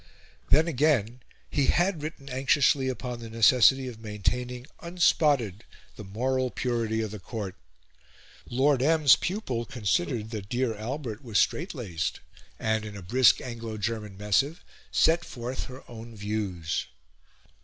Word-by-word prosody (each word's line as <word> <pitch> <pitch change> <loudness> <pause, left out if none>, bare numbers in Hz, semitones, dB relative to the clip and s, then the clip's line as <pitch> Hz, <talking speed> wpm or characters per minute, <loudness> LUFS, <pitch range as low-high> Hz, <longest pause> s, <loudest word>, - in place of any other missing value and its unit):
Then, 160 +2 +5
again, 130 -6 +1 0.3
he 140 -2 0
had 175 -2 +2
written 150 -2 -7
anxiously 135 0 +2
upon 125 -1 -4
the 115 -1 -8
necessity 125 +3 +5
of 120 -3 -8
maintaining 120 +4 -3
unspotted 145 - +2 0.3
the 105 - -9
moral 130 +6 -1
purity 115 -3 -1
of 110 - -4
the 105 - -7
Court. 100 -1 -5 1.0
Lord 135 +1 +2
M's 150 -1 +6
pupil 175 - -2
considered 110 -1 -1
that 105 -3 -6
dear 120 -1 0
Albert 115 0 -5
was 115 -5 -1
strait 170 +3 +1
laced, 90 - -3 0.4
and, 110 0 0
in 105 -2 -7
a 95 - -9
brisk 125 +7 +4
Anglo 115 -3 -6
German 105 -2 -3
missive, 120 - 0 0.3
set 170 +2 +3
forth 125 -1 -5
her 130 +1 -10
own 115 0 -10
views. 100 -6 -3
120 Hz, 135 wpm, -27 LUFS, 110-135 Hz, 1.0 s, M's